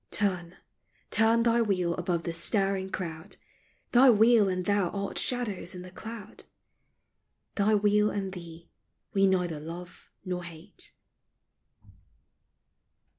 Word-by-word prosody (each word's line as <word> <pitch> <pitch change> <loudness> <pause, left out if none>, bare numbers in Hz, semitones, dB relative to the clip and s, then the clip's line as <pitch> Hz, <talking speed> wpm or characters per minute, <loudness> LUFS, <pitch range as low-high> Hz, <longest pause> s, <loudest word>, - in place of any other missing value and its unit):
Turn, 180 -4 -1 0.5
turn 225 +1 +4
thy 235 0 +3
wheel 185 -6 +1
above 175 -1 -2
the 170 - -3
staring 195 +2 +1
crowd; 160 -4 -6 0.5
Thy 255 +2 +7
wheel 225 -2 +5
and 185 -1 -2
thou 200 -3 +2
art 200 +1 -3
shadows 210 -8 -1
in 180 - -7
the 180 - -11
cloud; 220 +3 -9 1.1
Thy 210 +1 +2
wheel 210 0 +3
and 195 -2 -3
thee 170 -2 -11 0.4
we 195 -1 +4
neither 180 -4 0
love 170 +3 -9 0.2
nor 180 -1 -3
hate. 170 +3 -9
190 Hz, 120 wpm, -28 LUFS, 175-210 Hz, 1.1 s, Thy